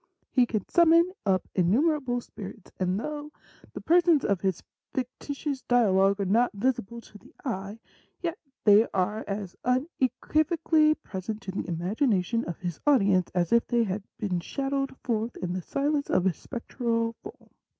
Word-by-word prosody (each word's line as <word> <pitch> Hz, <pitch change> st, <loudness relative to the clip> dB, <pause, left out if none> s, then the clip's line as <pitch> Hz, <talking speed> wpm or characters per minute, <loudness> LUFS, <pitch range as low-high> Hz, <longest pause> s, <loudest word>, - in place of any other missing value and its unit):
He 250 Hz, -2 st, +4 dB
can 215 Hz, -3 st, -2 dB
sum 340 Hz, -1 st, +4 dB
mon 335 Hz, +2 st, +5 dB, 0.2 s
up 185 Hz, -2 st, +2 dB
innumerable 245 Hz, -, +2 dB
spirits, 210 Hz, -2 st, -10 dB
and 185 Hz, +1 st, 0 dB
though 295 Hz, +4 st, -5 dB, 0.4 s
the -, -, -6 dB
persons 335 Hz, -3 st, +4 dB
of 200 Hz, -3 st, +1 dB
his 190 Hz, -3 st, -1 dB, 0.3 s
fictitious 275 Hz, +2 st, -4 dB
dialogue 200 Hz, -5 st, +3 dB
are 200 Hz, -, 0 dB
not 230 Hz, +6 st, +2 dB
visible 235 Hz, +1 st, -2 dB
to 210 Hz, -, -15 dB
the 265 Hz, -, -19 dB
eye, 200 Hz, -3 st, -4 dB, 0.4 s
yet 345 Hz, +1 st, -3 dB, 0.2 s
they 210 Hz, +2 st, +6 dB
are 210 Hz, +4 st, 0 dB
as 195 Hz, -2 st, -4 dB
une 250 Hz, +2 st, +2 dB, 0.3 s
quivocally 310 Hz, 0 st, +3 dB
present 210 Hz, +2 st, -5 dB
to 190 Hz, -, -5 dB
the 190 Hz, -, -4 dB
imagination 195 Hz, -, 0 dB
of 170 Hz, -, -5 dB
his 175 Hz, -3 st, -5 dB
audience 200 Hz, -10 st, +4 dB
as 175 Hz, +2 st, +1 dB
if 235 Hz, -, +4 dB
they 240 Hz, -1 st, +2 dB
had 205 Hz, -1 st, -2 dB, 0.2 s
been 190 Hz, -4 st, -1 dB
shadowed 275 Hz, +7 st, -2 dB
forth 230 Hz, -1 st, -2 dB
in 180 Hz, -1 st, -3 dB
the 185 Hz, -, -3 dB
silence 285 Hz, -, -1 dB
of 180 Hz, -, +2 dB
a 190 Hz, -, +3 dB
spectral 230 Hz, -, -2 dB
form.' 410 Hz, +3 st, -12 dB
230 Hz, 160 wpm, -27 LUFS, 190-275 Hz, 0.4 s, they